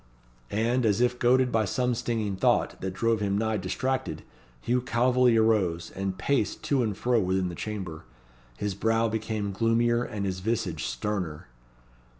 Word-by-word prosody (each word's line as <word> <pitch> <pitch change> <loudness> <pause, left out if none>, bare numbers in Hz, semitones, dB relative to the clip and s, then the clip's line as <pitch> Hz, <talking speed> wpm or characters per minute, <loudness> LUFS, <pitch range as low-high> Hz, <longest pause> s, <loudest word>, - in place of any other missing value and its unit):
And 120 +4 +1
as 110 -1 +2
if 125 0 +1
goaded 125 +1 +3
by 110 -1 +2
some 125 +5 0
stinging 110 -4 -2
thought, - - +1
that 95 - -2
drove 115 +1 +1
him 100 -1 0
nigh 110 0 0
distracted, 130 +8 -2 0.4
Hugh 125 - 0
Calveley 125 -1 +3
arose, 95 -7 +2
and 95 -1 -3
paced 140 +8 0
to 140 -3 +1
and 105 -4 -1
fro 120 -1 +2
within 95 -2 0
the - - -6
chamber. 90 -5 -6 0.5
His 105 -1 -2
brow 115 +3 +1
became 110 -2 -2
gloomier 115 +3 +2
and 105 -5 -4
his 95 -1 -2
visage 105 -5 -2
sterner. 75 +1 -3
110 Hz, 155 wpm, -27 LUFS, 95-120 Hz, 0.5 s, goaded